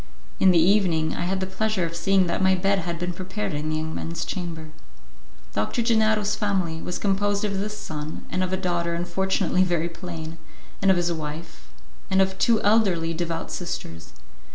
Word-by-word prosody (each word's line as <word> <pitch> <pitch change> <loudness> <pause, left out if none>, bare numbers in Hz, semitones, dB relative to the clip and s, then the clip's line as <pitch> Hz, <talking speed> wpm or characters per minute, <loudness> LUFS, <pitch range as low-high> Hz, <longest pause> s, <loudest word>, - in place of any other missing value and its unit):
In 190 - +6
the 180 - +5
evening, 170 -3 +3
I - - -2
had 190 +1 -1
the - - 0
pleasure 190 0 0
of 165 0 -5
seeing 190 +2 +3
that 170 - -1
my 190 0 +5
bed 195 +2 +2
had 170 -1 -3
been 180 +1 -2
prepared 190 +2 -4
in 150 +1 -2
the 155 - 0
young 160 0 -2
man's 165 0 -3
chamber. 165 -4 -5 0.8
Doctor 105 - 0
Gennaro's 220 -2 +3
family 185 -6 -1
was 180 - -3
composed 205 +1 +1
of 200 -2 -1
this 210 +1 -3
son 155 -3 -6
and 185 - 0
of 185 - -2
a 190 - +1
daughter 175 -2 -1
unfortunately 185 +2 +1
very 170 -2 0
plain, 165 -2 -7 0.4
of 195 -2 +4
his 175 -1 +1
wife 160 +1 -7 0.4
and 190 - +3
of 190 0 +2
two 230 -2 +4
elderly, 195 -6 +3
devout 165 0 -3
sisters. 80 - -5
180 Hz, 180 wpm, -25 LUFS, 165-195 Hz, 0.8 s, In